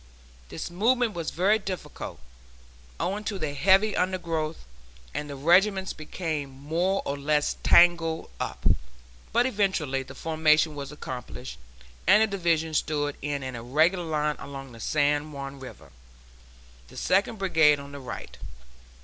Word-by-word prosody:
This -, -, -6 dB
movement 230 Hz, +5 st, +2 dB
was 170 Hz, -3 st, -3 dB
very 200 Hz, +6 st, +2 dB
difficult, 190 Hz, -, -6 dB, 0.8 s
owing 205 Hz, +3 st, -2 dB
to 205 Hz, -, -2 dB
the 155 Hz, -5 st, -3 dB
heavy 195 Hz, +7 st, +4 dB
undergrowth, 170 Hz, -4 st, -2 dB, 0.5 s
and 150 Hz, -, -4 dB
the 140 Hz, -, -5 dB
regiments 190 Hz, +6 st, +3 dB
became 155 Hz, -2 st, -4 dB
more 160 Hz, +8 st, -1 dB
or 140 Hz, -, -1 dB
less 150 Hz, +1 st, 0 dB
tangled 170 Hz, -, +4 dB
up, -, -, -5 dB, 0.7 s
but 240 Hz, +2 st, +3 dB
eventually 190 Hz, -, 0 dB
the 130 Hz, 0 st, -10 dB
formation 155 Hz, 0 st, +2 dB
was 140 Hz, -1 st, -6 dB
accomplished, 70 Hz, -, -7 dB, 0.5 s
and 210 Hz, +4 st, +7 dB
the -, -, +3 dB
Division 165 Hz, -3 st, +1 dB
stood 145 Hz, -1 st, 0 dB
in 145 Hz, -1 st, -2 dB
an 130 Hz, -1 st, -5 dB
irregular 155 Hz, +10 st, +2 dB
line 150 Hz, -1 st, 0 dB
along 135 Hz, -2 st, -8 dB
the 115 Hz, -, -12 dB
San 145 Hz, +3 st, +1 dB
Juan 140 Hz, 0 st, -7 dB
River, 130 Hz, -1 st, -11 dB, 1.0 s
the -, -, -14 dB
Second 200 Hz, +4 st, +1 dB
Brigade 160 Hz, -6 st, +4 dB
on 140 Hz, 0 st, -10 dB
the 140 Hz, -, -8 dB
right. 130 Hz, -, -8 dB
155 Hz, 140 wpm, -27 LUFS, 140-185 Hz, 1.0 s, and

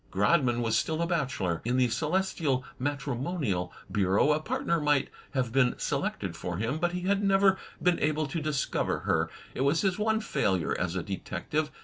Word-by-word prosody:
Grodman 120 Hz, -, +2 dB
was 115 Hz, -1 st, +1 dB
still 160 Hz, 0 st, 0 dB
a 170 Hz, -, +1 dB
bachelor. 130 Hz, -, -1 dB
In 125 Hz, +2 st, 0 dB
the 130 Hz, -1 st, +4 dB
celestial 155 Hz, -2 st, 0 dB
matrimonial 135 Hz, -, -2 dB, 0.2 s
bureau 100 Hz, +8 st, +3 dB
a 150 Hz, -, +2 dB
partner 230 Hz, -, -1 dB
might 145 Hz, -2 st, +2 dB, 0.3 s
have 125 Hz, -3 st, 0 dB
been 125 Hz, -1 st, +3 dB
selected -, -, -2 dB
for 85 Hz, -1 st, -4 dB
him, 115 Hz, -, -1 dB
but 175 Hz, +1 st, 0 dB
he 180 Hz, -, -2 dB
had 200 Hz, +2 st, +1 dB
never 195 Hz, 0 st, +5 dB
PORTRAITS 190 Hz, -, -10 dB
l6l -, -, -14 dB
been 180 Hz, -1 st, +3 dB
able 155 Hz, +1 st, +1 dB
to 150 Hz, +3 st, -3 dB
discover 150 Hz, -2 st, -1 dB
her. -, -, +1 dB, 0.2 s
It -, -, -3 dB
was 140 Hz, +4 st, +3 dB
his 195 Hz, 0 st, 0 dB
one 220 Hz, +1 st, +2 dB
failure 95 Hz, -, 0 dB
as 85 Hz, 0 st, -2 dB
a 90 Hz, -, -1 dB
detective. 150 Hz, -, -3 dB
145 Hz, 190 wpm, -29 LUFS, 120-170 Hz, 0.3 s, never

